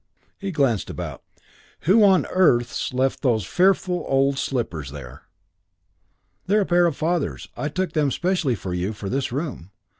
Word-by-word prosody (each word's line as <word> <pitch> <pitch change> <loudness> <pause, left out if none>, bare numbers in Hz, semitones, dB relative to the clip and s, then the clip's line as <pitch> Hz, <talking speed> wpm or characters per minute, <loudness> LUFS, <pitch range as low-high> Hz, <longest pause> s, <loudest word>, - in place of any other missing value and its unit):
He 195 - -4
glanced 135 - +1
about - - -6 0.6
"Who 205 +6 +5
on 190 -2 +5
earth's 120 -10 +2
left 130 +1 0
those 115 -8 +1
fearful 180 - +2
old 135 0 +2
slippers 90 - -3
there?" 65 -3 -10 1.2
"They're 210 +2 +3
a - - +1
pair 175 -1 +4
of 160 - -3
father's. 165 -1 -1
I 140 +5 -3
took 185 +4 -2
them 150 -3 +2
specially 175 -5 0
for 95 -3 -5
you 90 +4 -2
for 105 -2 -6
this 135 +1 -1
room. 135 - -4
140 Hz, 155 wpm, -23 LUFS, 115-180 Hz, 1.2 s, Who